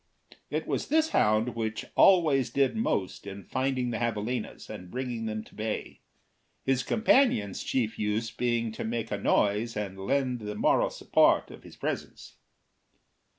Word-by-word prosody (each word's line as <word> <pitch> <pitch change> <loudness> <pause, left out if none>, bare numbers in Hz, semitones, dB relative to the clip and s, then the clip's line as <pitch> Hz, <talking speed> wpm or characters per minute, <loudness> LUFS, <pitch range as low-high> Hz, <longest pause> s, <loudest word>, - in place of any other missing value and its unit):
It - - -2
was - - -2
this 315 +1 +3
hound 110 - +3
which 110 -1 -3
always 155 -9 +5
did 140 +8 +1
most 100 - -1
in 100 0 -7
finding 130 -2 -1
the 115 - -2
javalinas 115 0 -3
and 90 0 -8
bringing 120 -1 -3
them 110 0 -3
to - - -19
bay, 110 0 -4 0.6
his 135 -1 +1
companion's 220 - +2
chief 115 -4 -1
use 110 +2 -1
being 115 -1 0
to 110 - -5
make 115 0 -3
a 100 - -1
noise 105 +3 +1
and 95 -2 -4
lend 130 -3 +1
the 105 -1 -5
moral - - +3
support - - +3
of - - -12
his - - -13
presence. - - -5
115 Hz, 150 wpm, -28 LUFS, 105-130 Hz, 0.6 s, always